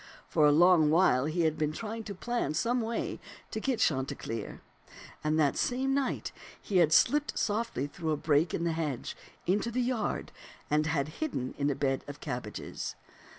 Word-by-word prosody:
For 150 - +4
a - - +6
long 165 0 +6
while 155 -6 +4
he 160 +3 0
had 160 -1 +1
been 150 -1 +1
trying 225 +4 -5
to 200 - -6
plan 235 -7 -2
some 240 +8 +1
way 230 +1 -3 0.3
to 220 - -2
get 260 +2 0
Chanticleer; 130 -5 -1 0.6
and 155 +1 +1
that 145 -3 +2
same 265 +2 0
night 275 -1 -1 0.3
he 195 - -1
had 165 -3 +5
slipped 295 - +3
softly 210 - -1
through 160 +3 -5
a 155 - +1
break 150 +2 +2
in 170 - -2
the 170 - +1
hedge 150 -6 -3 0.3
into 205 +5 +1
the 240 +2 -2
yard 245 -3 -1 0.4
and 150 +1 +3
had 150 -2 0
hidden 190 - -2
in 145 0 0
a 140 - 0
bed 135 -1 0
of 145 0 -8
cabbages. 125 -7 -5
160 Hz, 180 wpm, -30 LUFS, 145-225 Hz, 0.6 s, a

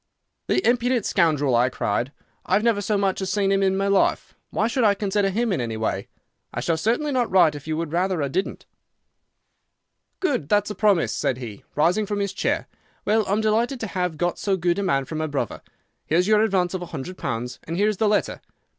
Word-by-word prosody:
"'The 370 - +1
impudent 245 -1 +2
scoundrel!' 150 -8 +2
I 120 +2 +3
cried. 120 +2 -1 0.4
'I've 195 +3 +2
never 230 -3 +2
so 205 +1 0
much 195 -1 0
as 190 - -2
seen 200 -2 +1
him 195 0 +2
in 190 0 +2
my 195 - 0
life. 200 -1 +1 0.2
Why 220 - 0
should 240 +1 0
I 205 -2 +4
consider 200 0 0
him 225 +2 0
in 150 - -1
any 115 -2 -3
way? 105 -3 -2 0.4
I - - -4
shall 165 - 0
certainly 240 - 0
not 250 -3 +1
write 180 -5 +5
if 145 +1 -9
you 155 0 -1
would 165 -2 -3
rather 180 -2 +1
I - - 0
didn't.' 185 +8 -3 1.5
"'Good! 255 - -1
That's 205 0 +2
a - - -2
promise,' 190 - +2
said 130 - -1
he, 115 -6 -8
rising 175 +8 +2
from 205 - -2
his 200 -1 -1
chair. - - -1 0.4
'Well, 215 0 +2
I'm 205 +3 +1
delighted 230 +5 +1
to - - -1
have 180 -4 -2
got 175 +2 -1
so 195 -2 0
good 175 +1 0
a - - 0
man 140 -9 +1
for 160 - -8
my 155 0 -1
brother. 145 -2 -3 0.5
Here's 175 +4 +2
your 215 0 +4
advance 190 -5 +1
of 185 - -3
a 175 - -6
hundred 170 +2 -6
pounds, 125 -1 -4
and 165 +2 -4
here 205 +2 +3
is 215 -2 0
the 215 +1 +2
letter. 210 - 0
190 Hz, 220 wpm, -23 LUFS, 155-210 Hz, 1.5 s, write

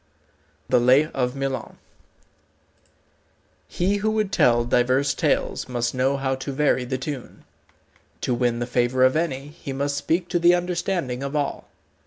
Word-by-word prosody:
XII 75 -1 -39
THE 125 - +4
LAY 130 +5 +5
OF 125 -1 -1
MILON 135 -1 -4 1.9
He 195 +3 0
who 210 +2 0
would 215 -2 0
tell 120 -7 +3
divers 130 +4 +2
tales - - -1
must 120 -1 -1
know 135 +2 +1
how 135 -1 -1
to 135 +1 -5
vary 135 -2 +1
the 130 +1 -2
tune. 130 -1 -7 0.8
To 125 - 0
win 120 -1 0
the 120 - -2
favour 125 +1 +1
of 130 +2 +4
any, 145 -4 -2
he 145 -2 -8
must 140 +1 -1
speak 170 +2 0
to 175 - +1
the 175 +1 +5
understanding 175 -7 -2
of 140 +2 -4
all. 145 -2 -2
135 Hz, 160 wpm, -23 LUFS, 125-150 Hz, 1.9 s, LAY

